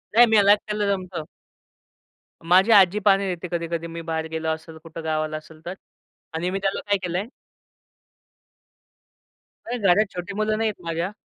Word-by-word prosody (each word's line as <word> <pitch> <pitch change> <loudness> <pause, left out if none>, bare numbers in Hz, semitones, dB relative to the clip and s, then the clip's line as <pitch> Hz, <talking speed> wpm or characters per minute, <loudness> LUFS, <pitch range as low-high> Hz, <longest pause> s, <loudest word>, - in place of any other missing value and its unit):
नाही 240 +1 +9
मला 200 0 +6
एकट्याला 210 0 -2
जमतं. 185 -4 -4 1.2
माझी 185 +6 +5
आजी 200 -1 +6
पाणी 200 -1 +4
देते 175 +1 -7
कधी-कधी 170 -1 -3
मी 165 0 -7
बाहेर 160 -1 -3
गेलो 160 0 -2
असेल, 160 0 -5
कुठं 165 0 -9
गावाला 155 -1 -1
असेल 155 +1 -15
तर. 175 - -4 0.6
आणि 170 +3 -2
मी 195 - -2
त्याला 195 0 -1
काय 200 - +4
केलंय 180 +4 -2 2.4
नाही 245 +2 -3
घरात 200 +3 +4
छोटी 180 +2 -5
मुलं 215 0 0
नाही 225 0 +1
आहे 200 -4 -9
माझ्या. 165 +4 -2
180 Hz, 155 wpm, -23 LUFS, 165-200 Hz, 2.4 s, नाही